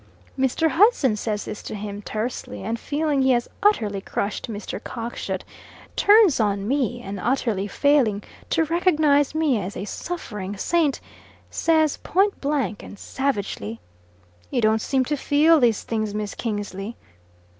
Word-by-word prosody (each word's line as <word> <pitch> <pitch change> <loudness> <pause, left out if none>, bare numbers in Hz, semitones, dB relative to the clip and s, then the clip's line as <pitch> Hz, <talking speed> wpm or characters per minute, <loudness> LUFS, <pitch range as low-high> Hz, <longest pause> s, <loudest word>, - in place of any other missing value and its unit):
Mr. 265 +5 +1
Hudson 330 - +4
says 210 -1 -3
this 210 - -6
to - - -6
him, 205 0 -6
tersely, 215 -1 -4
and 225 +3 -2
feeling 295 0 0
he 265 - +3
has 240 -1 0
utterly 215 - +2
crushed 200 +4 -3
Mr. 205 -1 -6
Cockshut, 235 0 -4 0.5
turns 410 - +5
on 200 -2 0
me, 245 -2 0
and 195 -2 -5
utterly 225 -3 0
failing 240 -4 +2 0.3
to 325 - +2
recognise 310 -4 +2
me 295 -9 +2
as 190 +2 -5
a 195 - -4
suffering 210 - -5
saint, 315 - +1 0.5
says 315 -2 +2
point 395 +3 +1
blank 275 -8 -1
and 205 - -11
savagely, 200 - -3 0.7
"You - - 0
don't 220 -1 +3
seem 265 +1 +1
to 295 - 0
feel 300 +3 +4
these 235 -5 +2
things, 215 -2 -2
Miss 210 -1 -3
Kingsley." 205 -1 -4
240 Hz, 145 wpm, -23 LUFS, 210-295 Hz, 0.7 s, turns